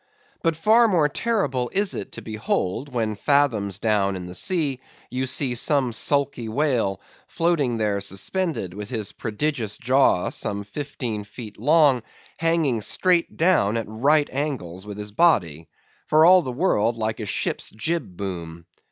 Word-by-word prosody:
But 165 -1 +1
far 220 +8 +4
more 170 -8 +3
terrible 140 - -1
is 200 0 +1
it - - -6
to - - -8
behold, 110 +3 -2
when 115 -3 -1
fathoms 110 -5 +1
down 100 -3 +1
in 90 -1 -6
the 90 - -8
sea, 145 - 0 0.3
you 130 +1 -2
see 130 -1 0
some 130 0 +1
sulky 140 -1 0
whale, 115 -7 0 0.3
floating 160 -8 0
there 105 -2 0
suspended, 105 - -2
with 105 +2 -7
his 110 -5 -3
prodigious 115 -1 -2
jaw, 130 -7 +2
some 100 0 -3
fifteen 120 -1 -5
feet 105 0 -10
long, 145 -1 +4 0.4
hanging 165 -8 +1
straight 175 - +1
down 155 - +3
at 115 - -2
right 145 +8 +2
angles 105 - -4
with 105 -1 -7
his 105 0 -5
body, 90 - +2 0.4
for 155 +1 +5
all 185 +1 +7
the 130 -6 -4
world 120 - +1
like 110 0 -2
a 110 - -4
ship's - - -2
jib 125 - -3
boom. 85 -4 -6
125 Hz, 150 wpm, -23 LUFS, 105-150 Hz, 0.4 s, all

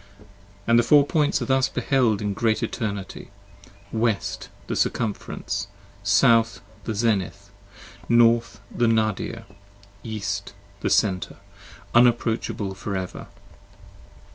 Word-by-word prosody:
And 115 0 +4
the - - +6
Four 140 +4 +5
Points 150 0 +1
are - - -3
thus 130 -1 +2
beheld 120 -7 +1
in 105 -1 -1
Great 110 +1 0
Eternity: 100 -5 -4 0.3
55 - - -20 0.2
West, 110 -2 -1 0.2
the - - -3
Circumference: 105 -2 -2 0.3
South, 115 +3 +3 0.3
the 110 - -3
Zenith: 100 -2 -1 0.6
North, 115 -2 +3
The 120 - +2
Nadir: 110 +1 0 0.6
East, 100 -3 -4 0.2
the - - -1
Center, 95 -3 +1 0.6
unapproachable 120 -4 +2
for 100 +1 -5
ever. 90 -1 -6
110 Hz, 110 wpm, -24 LUFS, 100-120 Hz, 0.6 s, the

